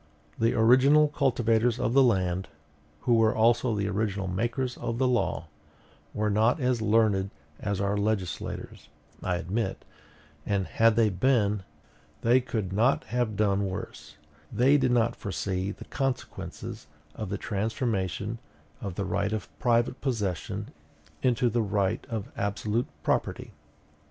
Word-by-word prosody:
The 115 +1 +2
original 130 +6 +5
cultivators 120 -4 +1
of 115 - 0
the 135 - +6
land, 95 -6 +2 0.5
who 120 - +2
were 115 -1 +4
also 115 +1 +3
the 100 -1 -1
original 100 -1 -1
makers 120 +7 -1
of 115 - -3
the 130 +1 +2
law, 120 -8 0 0.7
were 105 0 0
not 110 +8 +3
as 125 -3 +1
learned 105 -3 +2 0.3
as 100 -2 -2
our 100 +1 0
legislators, 100 -4 -3 0.3
I 90 - 0
admit; 90 +7 -3 0.6
and 100 +1 0
had 115 +2 +3
they 110 -2 +3
been, 105 0 +2 0.6
they 120 +3 +5
could 110 -6 -3
not 115 +7 +3
have 120 -4 0
done 100 -1 +1
worse: 95 - -7 0.3
they 135 +4 +4
did 130 -3 +3
not 120 -2 +2
foresee 95 -1 -3
the - - -10
consequences 135 - -4 0.3
of 110 -3 -5
the 100 - -2
transformation 105 - -2 0.4
of 100 -3 -5
the 100 - -2
right 100 +2 -1
of 110 -2 -3
private 120 +1 +1
possession 105 - -2 0.5
into 125 -1 +2
the 120 0 +1
right 100 -2 0
of 110 -4 -4
absolute 105 +3 -1 0.2
property. - - -1
110 Hz, 135 wpm, -28 LUFS, 100-120 Hz, 0.7 s, the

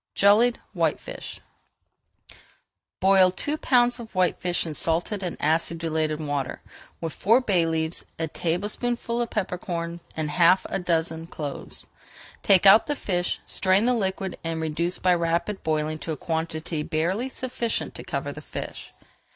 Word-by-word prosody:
JELLIED 220 +5 +5
WHITEFISH - - -3 1.6
Boil 190 -1 +6
two 290 +11 -1
pounds 245 -4 +3
of 225 -3 -10
whitefish 180 -1 +1
in 160 - -4
salted 170 +6 0
and 180 -3 -4
acidulated 160 0 0
water, 145 -3 -3 0.4
with 165 -2 -4
four 225 +5 +4
bay 185 -9 +2
leaves, 160 0 -1
a 160 - -2
tablespoonful 215 +9 -2
of 235 - -2
pepper 185 -4 -2
corns, 170 -1 -4 0.2
and 155 -1 -1
half 180 +3 +4
a - - 0
dozen 165 -2 -1
cloves. 145 -4 -6 0.6
Take 195 -1 +5
out 200 +3 +8
the 295 - 0
fish, 180 -8 -2
strain 190 +3 +3
the 250 - +3
liquid, 190 -4 -2
and 165 -1 -2
reduce 160 +3 -1
by 180 -1 +3
rapid 170 +4 -1
boiling 155 0 -1
to 165 - -5
a 155 - -3
quantity 160 0 -3
barely 175 +11 -1
sufficient 250 -3 -3
to - - -8
cover - - -3
the - - -9
fish. - - -7
175 Hz, 145 wpm, -25 LUFS, 160-205 Hz, 1.6 s, out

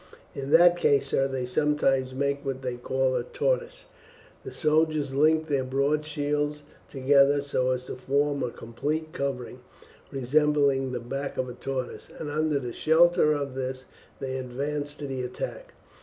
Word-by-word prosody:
"In 135 0 -5
that 175 +3 +6
case, 140 -4 +2
sir, 135 - +2
they 130 -2 -3
sometimes 135 -1 +1
make 140 +1 -1
what 135 -1 -4
they 125 -1 -2
call 130 +1 0
a 125 - +1
tortoise. - - -2 0.6
The - - -7
soldiers 155 -3 +1
link 155 +3 +3
their 140 -3 +1
broad 140 +4 0
shields 150 0 -2 0.3
together, 140 +1 +4
so 135 -2 0
as 125 -1 -1
to - - -6
form 140 +2 0
a - - -1
complete 150 +8 -4
covering, 130 -3 -4 0.5
resembling 140 0 +2
the 125 - -3
back 135 +4 -5
of 130 - -1
a - - -6
tortoise, 130 0 -5
and 150 -2 -5
under 145 -5 -1
shelter 160 -1 +4
of 140 -2 -3
this 130 0 -4 0.3
they 130 -1 -3
advance 145 +3 -3
to 150 - -7
the 135 -2 -3
attack. 485 - -6
140 Hz, 155 wpm, -27 LUFS, 130-150 Hz, 0.6 s, that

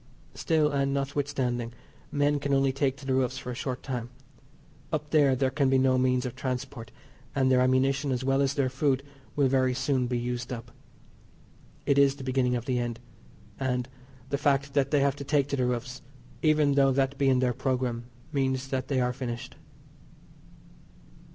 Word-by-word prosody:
Still, 155 -2 +1
and 140 -1 0
notwithstanding, 135 -4 -2 0.4
men 145 0 +2
can 140 0 0
only 135 0 +3
take 135 0 0
to 145 - -12
the 135 - 0
roofs 130 0 +1
for 125 - -5
a - - -5
short 130 0 -4
time. 120 -3 -4 0.8
Up 150 -2 -3
there, 145 -4 +4
there 130 0 +1
can 140 -1 +2
be 135 - +4
no 130 -1 +3
means 130 0 +2
of 125 - -4
transport, 125 -3 -4 0.5
and 130 -1 +3
their 125 -1 +5
ammunition, 135 +2 +2
as 130 0 -1
well 135 +1 +2
as 140 +1 +1
their 140 -2 +2
food, 135 +1 0 0.3
will 140 -2 +3
very 130 -1 +2
soon 130 -1 0
be 125 0 -1
used 120 0 -3
up. 120 -1 -6 1.1
It 140 0 +3
is 140 -1 +5
the 140 - -9
beginning 130 -1 +1
of 120 -1 -3
the 125 -2 0
end, 120 -1 -3 0.6
and 125 -2 -1 0.4
the 140 - -1
fact 140 -1 +1
that 140 -1 +2
they 145 -1 +3
have 140 0 +1
to 140 - -5
take 140 -1 +1
to 140 - 0
the 125 -2 +1
roofs, 125 +1 -3 0.4
even 150 -2 +3
though 135 -1 +4
that 135 +1 0
be 135 -1 +3
in 130 - +4
their 125 -1 +2
programme, 125 -2 -1 0.3
means 135 -1 0
that 130 -2 -2
they 135 -2 +1
are 125 0 +1
finished. 120 -2 -5
130 Hz, 190 wpm, -28 LUFS, 125-140 Hz, 1.1 s, their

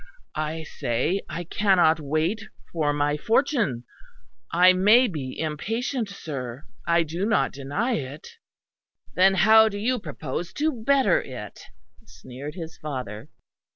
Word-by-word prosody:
I 155 +1 -3
say 150 +7 -1
I 175 - -4
cannot 175 -3 +3
wait 155 +9 -1 0.3
for 155 -3 +1
my 145 0 0
fortune; 225 - +1 0.7
I 180 +2 +6
may 210 +7 +5
be 140 - -5
impatient, 225 - -2
sir 135 -8 -6 0.2
I 170 0 +4
do 165 +4 -4
not 215 +1 +2
deny 145 - -2
it." 140 +1 -7 0.9
"Then 190 +1 +4
how 220 +4 +6
do 205 - -6
you 245 +4 0
propose 170 0 -5
to 310 +2 0
better 260 - +2
it?" 115 -6 -9 0.5
sneered 135 +5 -9
his 165 -3 -8
father. 125 -8 -6
170 Hz, 125 wpm, -25 LUFS, 145-215 Hz, 0.9 s, I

